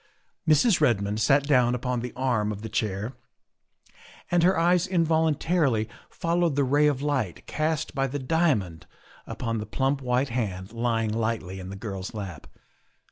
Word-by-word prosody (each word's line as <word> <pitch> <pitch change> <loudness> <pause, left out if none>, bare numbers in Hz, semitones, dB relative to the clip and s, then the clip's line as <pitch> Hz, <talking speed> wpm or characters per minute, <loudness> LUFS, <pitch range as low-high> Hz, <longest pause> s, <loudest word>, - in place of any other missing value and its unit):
Mrs. 160 +5 +4
Redmond 105 -5 +1
sat 135 +5 +4
down 125 -4 +3
upon 125 0 -2
the 125 +1 -5
arm 120 -5 0
of 105 0 -7
the 110 - -5
chair 105 +2 -2 1.2
and 175 -1 +4
her 185 +2 +4
eyes 175 +2 +3
involuntarily 160 - +1 0.2
followed 170 -2 0
the 140 - +2
ray 145 +3 +3
of 140 -2 0
light 135 - -2
cast 155 0 -1
by 135 -1 0
the 140 +3 -4
diamond 130 - 0 0.4
upon 115 -2 -3
the 105 - -5
plump 135 +4 0
white 125 +2 0
hand 100 -4 -3
lying 115 -2 0
lightly 110 -4 -2
in 95 0 -7
the 100 - -6
girl's 95 0 -6
lap. 95 -8 -7
125 Hz, 155 wpm, -26 LUFS, 105-150 Hz, 1.2 s, Mrs